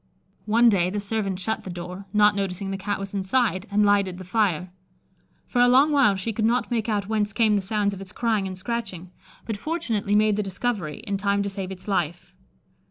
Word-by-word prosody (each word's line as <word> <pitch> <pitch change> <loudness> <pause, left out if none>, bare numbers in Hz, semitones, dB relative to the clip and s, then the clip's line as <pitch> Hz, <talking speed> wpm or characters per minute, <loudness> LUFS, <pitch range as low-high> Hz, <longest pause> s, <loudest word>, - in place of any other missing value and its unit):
One 230 +3 +5
day 185 -5 +3
the 205 +2 -2
servant 200 -2 -2
shut 220 +4 -3
the - - -7
door, 180 +2 -7
not 210 0 +4
noticing 195 0 -3
the - - -2
Cat 200 +1 -2
was 195 0 -7
inside, 200 0 0
and 210 +1 +3
lighted 200 -3 +2
the 185 - -8
fire. 180 -3 0 0.7
For 245 - 0
a 245 - +6
long 265 +5 +5
while 275 -9 +4
she 195 +4 -3
could 215 - -2
not 240 +3 +1
make 230 -1 -1
out 205 -2 -1
whence 210 -1 0
came 220 -2 +3
the 200 - +1
sounds 205 0 0
of 195 - -8
its 190 -1 -10
crying 220 -5 0
and 185 -1 -6
scratching, 185 -4 -5 0.3
but 220 -3 -3
fortunately 225 -8 -1
made 210 -1 +3
the - - +1
discovery 195 -4 -3
in 200 -4 -3
time 200 +1 +1
to 200 - -3
save 195 -1 -5
its 190 0 -9
life. 175 -4 -2
205 Hz, 215 wpm, -24 LUFS, 190-220 Hz, 0.7 s, a